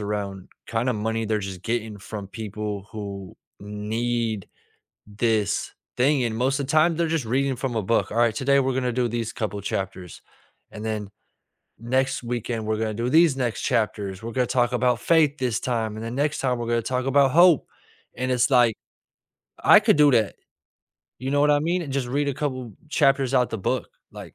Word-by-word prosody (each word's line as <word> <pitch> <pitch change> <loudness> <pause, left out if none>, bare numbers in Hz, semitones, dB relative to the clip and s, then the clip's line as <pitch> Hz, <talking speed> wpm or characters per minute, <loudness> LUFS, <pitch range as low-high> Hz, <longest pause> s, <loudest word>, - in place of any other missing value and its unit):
around 100 -2 -4 0.2
kinda 120 +2 0
money 110 +1 -2
they're 110 0 0
just 95 -1 -10
getting 110 -3 -3
from 100 0 -7
people 105 -2 -5
who 100 -3 -7 0.2
need 110 +1 -2 0.6
this 105 0 0 0.3
thing, 135 +1 +3
and 115 -2 -1
most 135 +3 +1
of 140 - -1
the - - -2
time, 155 +1 +4
they're 170 0 0
just 160 -5 -1
reading 135 +3 0
from 125 -1 -3
a 110 - +1
book. 115 +4 +1
"Alright, 115 0 +2
today, 140 +3 +3
we're 135 -1 0
gonna 125 -1 0
do 125 0 +1
these 115 -1 -3
couple 105 -2 -3
chapters, 95 -2 -5 0.5
and 105 - -8
then 105 -2 -3 0.7
next 130 +4 0
weekend, 120 -1 -3
we're 110 0 -1
gonna 110 -1 -2
do 120 +3 -2
these 160 -1 +5
next 120 -5 -2
chapters. 100 -3 -1
We're 115 +1 -5
gonna 125 0 +1
talk 120 0 +1
about 125 -1 +1
faith 155 +1 +3
this 125 -4 -1
time, 110 -4 -2
and 110 - -6
then 115 - -5
next 145 +1 0
time, 125 -2 0
we're 120 - -4
gonna 120 0 +2
talk 125 +2 -2
about 135 -1 +4
hope." 170 -2 +6 0.5
And 130 0 -1
it's 125 +2 +2
like, 120 -4 +5 0.9
I - - +8
could - - +3
do 150 -1 +6
that, 110 -5 +2 0.9
you 130 - -3
know 145 0 +2
what 150 - +4
I 145 - +3
mean, 175 +4 0
and 145 -5 -6
just 135 -2 -1
read 145 +3 0
a 140 - -1
couple 130 -5 -4 0.2
chapters 135 -3 +2
out 125 -1 +3
the 115 - -3
book, 95 - -2 0.2
like - - -10
120 Hz, 195 wpm, -24 LUFS, 110-135 Hz, 0.9 s, I